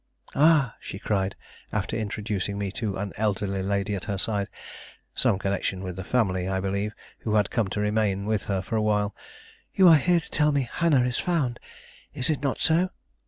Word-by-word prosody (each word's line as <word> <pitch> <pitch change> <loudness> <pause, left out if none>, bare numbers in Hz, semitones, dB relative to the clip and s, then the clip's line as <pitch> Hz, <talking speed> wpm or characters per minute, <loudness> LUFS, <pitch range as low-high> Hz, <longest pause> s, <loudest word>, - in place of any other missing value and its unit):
"Ah," 150 -5 +4
she - - -7
cried, 100 -2 -1 0.4
after 105 -1 -2
introducing 105 -2 -2
me 100 -1 -2
to 100 -1 -3
an 100 0 -4
elderly 100 -2 0
lady 100 +1 -1
at 95 - -4
her 100 - -2
side, 100 0 0 0.7
some - - +3
connection 100 -1 -2
of 90 - -5
the 95 - -5
family, 95 -5 +1
I 95 0 0
believe, 100 +2 -2 0.2
who 110 -1 -1
had 105 -2 +2
come 115 -5 +1
to 100 - -3
remain 105 -2 +1
with 110 -1 0
her 95 -2 -1
for 105 - -3
a 110 - +2
while, 105 -1 +1 0.6
"you 190 -2 +7
are 165 -2 +9
here 175 +3 +3
to 160 - -10
tell 150 0 +3
me 140 -3 0
Hannah 155 -7 +3
is 125 0 0
found; 145 -9 0 0.6
is 130 +5 +1
it 150 - -2
not 140 -2 0
so?" 170 +3 +3
105 Hz, 195 wpm, -26 LUFS, 100-125 Hz, 0.7 s, are